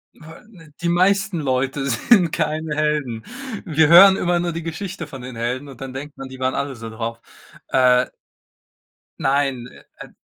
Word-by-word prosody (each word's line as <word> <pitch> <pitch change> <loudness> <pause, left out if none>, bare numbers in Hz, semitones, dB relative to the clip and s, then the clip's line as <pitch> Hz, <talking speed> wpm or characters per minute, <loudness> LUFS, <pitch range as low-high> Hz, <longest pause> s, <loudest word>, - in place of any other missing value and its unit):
Ja 160 +1 -14
ne, 165 -9 -17
die 170 - -1
meisten 190 +1 +2
Leute 135 0 -1
sind 175 - +3
keine 155 -1 -2
Helden. 150 -7 -1 0.4
Wir 160 -3 +3
hören 190 +4 +9
immer 175 -2 0
nur 175 0 -1
die 170 0 -5
Geschichte 170 +1 -6
von 135 -4 -10
den 125 -2 -8
Helden 125 +4 -3
und 135 -3 -12
dann 135 -1 -6
denkt 140 +3 -8
man, 135 -1 -7
die 130 0 -11
waren 130 0 0
alle 140 -1 -3
so 115 -1 -8
drauf. 115 +1 -5 0.5
Äh 125 -1 +4 1.1
Nein, 135 -3 0
äh, - - -16 0.2
e - - -15
d - - -26
145 Hz, 180 wpm, -21 LUFS, 130-170 Hz, 1.1 s, hören